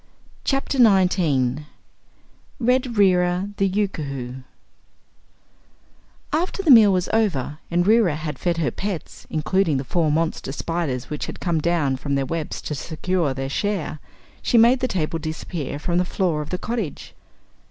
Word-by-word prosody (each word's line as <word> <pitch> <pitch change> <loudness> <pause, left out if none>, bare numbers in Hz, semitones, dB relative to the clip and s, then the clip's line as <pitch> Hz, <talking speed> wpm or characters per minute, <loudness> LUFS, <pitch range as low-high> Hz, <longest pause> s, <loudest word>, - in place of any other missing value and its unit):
Chapter 275 0 -1
Nineteen 170 - +3 0.9
Red 250 -1 +1
Reera, 180 0 +3
the 195 - +2
Yookoohoo 140 -10 -3 1.9
After 360 +5 -1
the 320 - +5
meal 220 -5 +8
was 185 -1 +1
over 170 - 0
and 175 +1 +1
Reera 210 -6 +4
had 155 0 -5
fed 175 -2 0
her 165 -3 0
pets, 195 -4 -6
including 160 0 +1
the 130 - -2
four 155 +3 +1
monster 160 -3 -1
spiders 150 -4 -3
which 150 - -3
had - - -7
come 170 -4 0
down 150 -5 +1
from 140 +1 -2
their 135 -1 0
webs 160 +2 -4
to - - -3
secure 160 0 -1
their 135 0 -3
share, 170 0 -2 0.4
she 240 - +2
made 235 +3 +6
the 255 - 0
table 165 -6 -2
disappear 155 -2 -5
from 175 +4 0
the - - +3
floor 175 -4 -1
of 150 - -7
the 180 - -2
cottage. 215 - -4
170 Hz, 150 wpm, -22 LUFS, 150-200 Hz, 1.9 s, meal